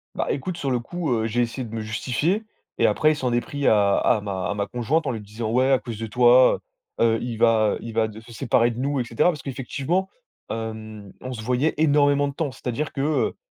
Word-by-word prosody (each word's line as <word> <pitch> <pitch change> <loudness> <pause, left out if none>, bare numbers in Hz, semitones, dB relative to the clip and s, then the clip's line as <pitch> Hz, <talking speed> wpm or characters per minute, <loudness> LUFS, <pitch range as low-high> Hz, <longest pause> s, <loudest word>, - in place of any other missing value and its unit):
Bah, - - -1
écoute, 170 +5 -3
sur 135 -2 -2
le 125 - +1
coup, 160 +2 -3
heu, 110 -1 0
j'ai 120 +2 0
essayé 120 +2 -2
de 115 - -10
me 115 - -3
justifier 130 - -1 0.3
et - - +3
après, 155 - +3
il - - -4
s'en 125 -4 -1
est 120 - +3
pris 140 +4 -5
à 100 -2 +4
à 110 - +3
ma 95 -2 -3
à - - 0
ma 100 -1 -1
conjointe, 130 +7 0
en - - +1
lui 110 -3 -5
disant: 110 +2 -5
«Ouais, 130 +3 +3
à 130 - +4
cause 115 0 -7
de 115 - -4
toi, 125 +3 +5 0.4
heu 115 - +4
heu, - - -2
il 120 -2 -4
va, 110 -2 +4
heu, - - -5
il 115 -1 -7
va 110 -1 +2
de 110 +1 -10
se 115 +1 -14
séparer 115 +1 +2
de 115 - -7
nous», 140 0 0
et - - +1
cetera. 120 +9 +2
Parce 150 -5 -3
qu'effectivement, 140 +8 -2 0.4
hem, 110 -2 -6
on 130 - -6
se 110 - -6
voyait 125 +6 +1
énormément 145 -2 +3
de 140 - -5
temps. 145 -3 -2
C'est-à-dire 130 +3 -4
que, 135 - -4
heu 150 +2 0
120 Hz, 255 wpm, -24 LUFS, 110-140 Hz, 0.4 s, toi